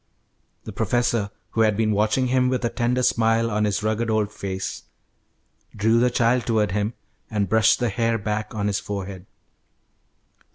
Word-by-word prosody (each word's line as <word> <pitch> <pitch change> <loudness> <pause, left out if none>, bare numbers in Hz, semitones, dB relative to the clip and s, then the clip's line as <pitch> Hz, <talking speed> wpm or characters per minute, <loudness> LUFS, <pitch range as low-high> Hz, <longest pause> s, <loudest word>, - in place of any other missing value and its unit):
The - - -7
professor, 120 -4 0 0.2
who 115 - 0
had 105 -2 +3
been 110 -1 +1
watching 110 +5 +1
him 125 0 +2
with 130 -1 -1
a - - +1
tender 125 +1 0
smile 115 -1 +2
on 105 0 +1
his 105 0 -1
rugged 110 +2 0
old 110 -1 0
face, 95 -2 -5 0.9
drew 110 +2 +3
the 125 +1 +3
child 120 +1 +1
toward 110 -4 +1
him, 105 +3 -1 0.3
and 105 -3 -1
brushed 110 +3 +4
the 120 -2 0
hair 115 +2 0
back 105 +1 -3
on 105 -1 -2
his 100 -1 0
forehead. 100 -2 -6
110 Hz, 165 wpm, -23 LUFS, 105-115 Hz, 0.9 s, brushed